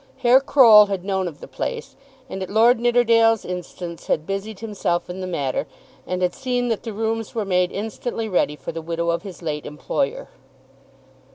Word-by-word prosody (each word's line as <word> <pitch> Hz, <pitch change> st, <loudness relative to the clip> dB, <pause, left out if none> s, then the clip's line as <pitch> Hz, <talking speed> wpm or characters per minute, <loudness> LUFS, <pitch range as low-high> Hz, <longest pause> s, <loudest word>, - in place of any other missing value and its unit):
Herr 250 Hz, +2 st, +5 dB
Croll 230 Hz, -7 st, +7 dB
had 195 Hz, -2 st, -4 dB
known 190 Hz, -2 st, -1 dB
of 155 Hz, -4 st, -9 dB
the -, -, -9 dB
place, 470 Hz, 0 st, -5 dB, 0.3 s
and 190 Hz, -6 st, -6 dB
at 190 Hz, -, -4 dB
Lord 225 Hz, +3 st, +4 dB
Nidderdale's 230 Hz, -2 st, +3 dB
instance 175 Hz, -1 st, -7 dB
had 155 Hz, -, 0 dB
busied 195 Hz, +2 st, -4 dB
himself 200 Hz, -6 st, -2 dB
in 185 Hz, +1 st, -7 dB
the 185 Hz, -, -4 dB
matter, 145 Hz, -4 st, -2 dB, 0.4 s
and 180 Hz, 0 st, -2 dB
had 180 Hz, -1 st, +1 dB
seen 250 Hz, -2 st, -1 dB
that 225 Hz, -, -1 dB
the 230 Hz, -, -6 dB
rooms 225 Hz, +1 st, -3 dB
were 220 Hz, -3 st, -1 dB
made 180 Hz, -1 st, +1 dB
instantly 225 Hz, +2 st, -4 dB
ready 180 Hz, -6 st, +1 dB
for -, -, -7 dB
the 165 Hz, 0 st, -6 dB
widow 170 Hz, +1 st, -1 dB
of 170 Hz, 0 st, -2 dB
his 185 Hz, -2 st, -10 dB
late 150 Hz, -2 st, -3 dB
employer. 280 Hz, -, -3 dB
200 Hz, 185 wpm, -22 LUFS, 175-230 Hz, 0.4 s, Croll